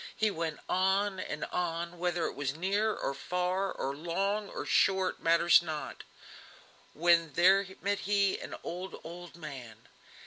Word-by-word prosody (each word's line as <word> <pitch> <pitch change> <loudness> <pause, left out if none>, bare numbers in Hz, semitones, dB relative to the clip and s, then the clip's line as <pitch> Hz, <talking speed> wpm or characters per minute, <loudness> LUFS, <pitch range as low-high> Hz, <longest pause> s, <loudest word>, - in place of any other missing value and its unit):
He 215 -1 +2
went 160 -4 -3
on 190 +1 +1
and 150 -4 -4
on, 170 0 -2
whether 175 -1 0
it - - -2
was 140 0 -3
near 200 +6 +1
or 140 - -2
far, 180 +6 -1
or 135 +1 -3
long 195 +6 -1
or - - -5
short, 190 -1 +2
matters 170 +1 +5
not; 155 -3 -5 0.9
when 170 -1 +3
there 190 +3 +5 0.2
met 200 +1 0
him 200 -1 +2
an - - -6
old, 180 +2 -6
old 175 +1 -9
man. 125 -8 -9
175 Hz, 145 wpm, -31 LUFS, 165-190 Hz, 0.9 s, matters